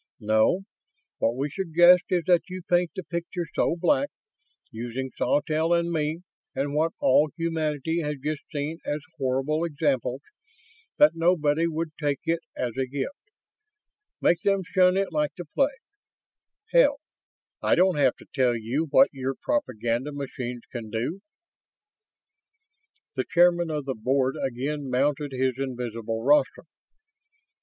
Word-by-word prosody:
No. 110 - +2 0.6
What 115 - +1
we 140 +3 -2
suggest 175 0 +5
is 180 -2 +1
that 180 -1 +3
you 185 0 -6
paint 175 0 +2
the 190 - -4
picture 170 +1 -4
so - - +1
black, 285 - +2 0.6
using 120 +3 -5
Sawtelle 155 +3 +1
and 170 0 +1
me 155 +1 -1 0.3
and 140 +2 -1
what 160 +2 +1
all 145 +4 +4
humanity 160 -1 -1
has 150 -1 -2
just 150 +2 -3
seen 150 +2 -3
as 150 +1 -2 0.2
horrible 135 +4 0
examples, 145 -5 -1 0.8
that 295 0 +7
nobody 165 -2 +2
would 165 0 -3
take 145 -2 0
it 165 0 0 0.2
as 120 -3 -2
a 130 -1 0
gift. 140 - -3 1.1
Make 170 -1 +2
them 195 -1 +1
shun 185 +1 +3
it 195 -1 0
like 150 -2 -1
the 175 - -6
plague. 275 - +1 1.0
Hell, - - +5 0.6
I - - +3
don't 185 -2 +3
have 135 -3 +4
to - - -16
tell 125 -3 +2
you 125 +9 -2
what 270 - +6
your 135 0 -3
propaganda 125 - -1
machines 125 -4 -5
can 115 -3 -6
do." 120 - -3 2.0
The 130 - -1
Chairman 175 0 +4
of 150 -3 -3
the 135 - -2
Board 130 +3 0
again 135 +2 -3
mounted 140 +3 0
his 130 0 -1
invisible 115 -4 -4
rostrum. 145 +3 +3
150 Hz, 140 wpm, -26 LUFS, 130-170 Hz, 2.0 s, that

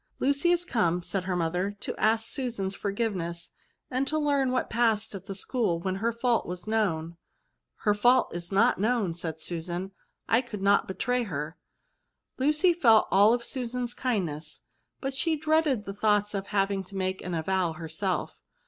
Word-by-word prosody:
" - - -43
Lucy 280 +5 +2
is 350 0 +3
come," 180 - +1
said 190 +1 -3
her 185 -1 -1
mother, 180 +4 -1
" - - -46
to - - -4
ask 225 +1 +2
Susan's 230 -8 -2
forgiveness, 195 -5 -3 0.4
and 260 +2 0
to 310 - 0
learn 285 -3 +2
what 255 - 0
passed 220 -2 +1
at 190 -1 -8
the 195 - -4
school 200 -4 0
when 185 +2 -2
her 230 +4 0
fault 235 0 0
was 180 0 -6
known." 170 -7 0 0.3
" - - -53
Her 210 - +4
fault 245 +5 +3
is 175 +1 -5
not 225 +4 +3
known,'' 215 -4 +1
said 165 -2 -5
Susan; 175 +3 -4 0.2
" - - -50
I - - +3
could 210 -6 -7
not 200 0 +4
betray 245 +6 0
her." 160 -4 -4 0.8
Lucy 300 +6 +3
felt 230 -10 +5
all 210 +5 +6
Susan's 245 0 -3
kind 240 -9 0
ness, 150 0 -6 0.4
but 270 0 -2
she 320 +4 +1
dreaded 305 -7 +1
the 195 - -5
thoughts 210 0 +2
of 200 0 -3
having 195 -1 0
to 195 - -13
make 190 0 -1
the 180 -2 -3
avowal 180 +1 0
herself. 165 +2 -3
205 Hz, 185 wpm, -28 LUFS, 180-245 Hz, 0.8 s, all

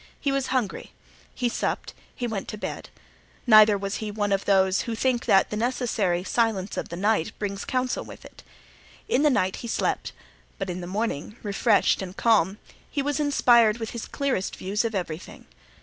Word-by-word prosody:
He 280 - 0
was 275 -1 0
hungry; 245 -7 -2 0.4
he 250 - 0
supped, 235 - -2 0.2
he 245 - -3
went 220 -5 -3
to 215 - -6
bed. - - -6 0.6
Neither 215 -3 +7
was 195 0 -3
he 215 - -4
one 205 -1 -2
of 195 0 +1
those 190 -1 +3
who 230 - -2
think 250 0 0
that 195 - +4
the - - -2
necessary 220 -6 0
silence 215 -3 0
of - - -4
the 170 - -5
night 200 -1 +1
brings 200 -1 -4
counsel 255 -1 -1
with - - -12
it. - - -14 0.7
In 260 - +2
the 300 - +5
night 190 -8 +1
he 235 - -7
slept, - - -1 0.5
but - - -3
in 180 +1 -5
the 175 - -6
morning, 210 -1 -3
refreshed 205 0 +2
and 190 0 -7
calm, 210 -4 +3 0.3
he 280 - -2
was 290 +1 -1
inspired 240 -6 +4
with 225 -2 -5
his 235 - -6
clearest 270 -9 -2
views 200 +4 -1
of 225 -2 -2
everything. 175 -3 -5
215 Hz, 185 wpm, -25 LUFS, 195-240 Hz, 0.7 s, Neither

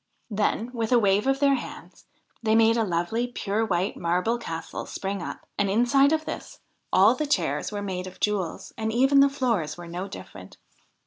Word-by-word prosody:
Then, 215 +3 0
with 230 -1 -2
a 245 - +6
wave 205 +1 +2
of 270 0 +2
their 280 -1 +4
wands, 260 - -7 0.4
they 220 -1 +2
made 225 0 +5
a 230 - +2
lovely, 190 +6 -1
pure 220 -3 -2
white 190 -1 0
marble 180 +8 0
castle 165 -7 -6
spring 195 -1 -4
up, - - -7
and, 200 -1 +2
inside 245 +7 +4
of 315 0 0
this, - - -7 0.3
all 195 +5 +6
the 295 +4 -2
chairs 160 - 0
were 205 -1 -4
made 185 -2 -4
of 185 - -11
jewels, 200 -5 -2
and 220 0 -1
even 270 +4 +4
the 280 0 +6
floors 230 - -1
were 175 -1 -9
no 180 +3 -5
different. 95 - -11
215 Hz, 190 wpm, -26 LUFS, 185-245 Hz, 0.4 s, a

